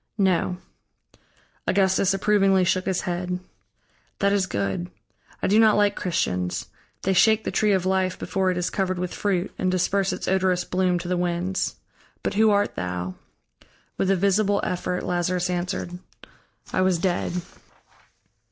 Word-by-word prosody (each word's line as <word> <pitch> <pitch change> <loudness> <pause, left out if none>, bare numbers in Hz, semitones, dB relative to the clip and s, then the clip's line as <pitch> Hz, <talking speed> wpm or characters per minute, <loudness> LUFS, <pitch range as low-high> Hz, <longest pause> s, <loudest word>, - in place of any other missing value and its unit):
"No." 185 -2 +1 1.1
Augustus 190 0 +3
approvingly 195 -1 +3
shook 185 +1 0
his 190 -1 0
head. 180 0 -3 0.8
"That 200 0 +2
is 195 -2 +1
good. 100 - -2 0.5
I - - +2
do 210 +3 +4
not 220 -2 +5
like 205 0 +3
Christians. 90 - -2 0.3
They 190 - +2
shake 220 +4 +4
the - - -2
tree 210 -1 +2
of 185 -2 +1
life 185 -1 +1
before 190 -1 -1
it 180 - -1
is 180 - -1
covered 185 -2 -1
with 180 0 -3
fruit, 195 -2 -1
and 185 - +1
disperse 190 +2 +1
its - - -5
odorous 185 -1 +2
bloom 180 0 +1
to 175 - -5
the 180 0 0
winds. 175 +2 -1 0.5
But - - -1
who 220 +2 +4
art 205 0 +2
thou?" 90 0 -4 0.9
With 190 - +1
a 195 - +4
visible 200 +2 +2
effort 180 0 -2
Lazarus 180 0 0
answered: 180 0 -3 0.7
"I - - +2
was 185 -1 +3
dead." 175 0 -1
185 Hz, 150 wpm, -24 LUFS, 180-195 Hz, 1.1 s, not